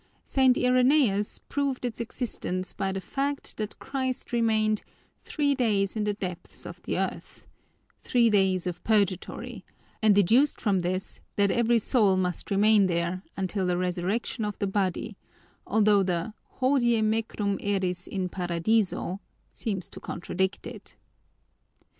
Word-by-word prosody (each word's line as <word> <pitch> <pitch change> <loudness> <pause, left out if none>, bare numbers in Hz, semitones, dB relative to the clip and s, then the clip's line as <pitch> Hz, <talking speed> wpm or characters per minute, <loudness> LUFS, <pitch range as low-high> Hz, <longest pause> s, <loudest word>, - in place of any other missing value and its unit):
St. 260 -2 +3
Irenaeus 250 -4 +3
proved 275 -3 -1
its 240 -3 -4
existence 215 -6 -3
by 195 -1 -2
the 195 - -3
fact 280 +8 -3
that 215 -1 -4
Christ 260 -2 -3
remained 220 -2 +2 0.4
'three 285 -2 0
days 210 -7 +1
in 215 -1 -1
the 210 -1 0
depths 180 -4 -6
of - - -9
the - - -3
earth,' - - -4 0.6
three 240 -2 +3
days 190 -3 +2
of 180 -2 -4
purgatory, 200 -4 0 0.4
and 215 -2 +5
deduced 230 +9 +4
from 200 -4 +1
this 185 +2 -3
that 200 -1 +3
every 235 0 +3
soul 210 -4 +3
must 180 -2 -1
remain 205 0 +4
there 170 +1 -1 0.2
until 190 0 -1
the 180 -1 +1
resurrection 185 +6 -1
of 210 -1 -3
the - - -1
body, 195 +1 -1 0.5
although 210 -1 +4
the 180 +2 -1 0.3
'Hodie 245 -4 +3
mecum 215 -2 0
eris 185 -3 -1
in 190 -2 -2
Paradiso' 180 +2 0 0.3
seems 195 -5 -3
to - - -9
contradict 190 +3 -3
it. - - -10
205 Hz, 135 wpm, -27 LUFS, 185-235 Hz, 0.6 s, and